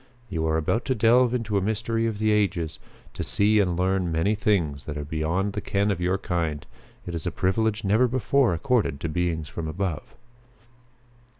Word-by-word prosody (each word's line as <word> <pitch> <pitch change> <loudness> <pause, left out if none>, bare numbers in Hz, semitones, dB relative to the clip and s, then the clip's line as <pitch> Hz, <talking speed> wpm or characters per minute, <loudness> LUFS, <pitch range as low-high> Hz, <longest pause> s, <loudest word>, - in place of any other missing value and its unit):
You 80 -4 -1
are 80 0 +1
about 80 +9 0
to 130 - 0
delve 120 +2 +4
into 110 -4 0
a - - -4
mystery 115 +3 -1
of 110 -2 -3
the 110 +1 +1
ages; 95 -6 0 0.3
to - - -4
see 105 +1 +3
and 90 -4 +1
learn 95 -1 +1
many 80 +6 +1
things 90 -10 0
that 75 -1 -5
are 75 - -4
beyond 80 +6 -1
the - - -3
ken 100 +1 0
of 90 -3 -2
your 90 +2 +1
kind. 85 -6 -2 0.4
It 85 - -5
is 85 0 -3
a - - 0
privilege 105 +5 0
never 110 +6 +3
before 130 +1 +2
accorded 110 - 0
to 85 - -2
beings 80 -2 -1
from 80 0 -5
above." 85 0 -4
95 Hz, 190 wpm, -25 LUFS, 80-110 Hz, 0.4 s, delve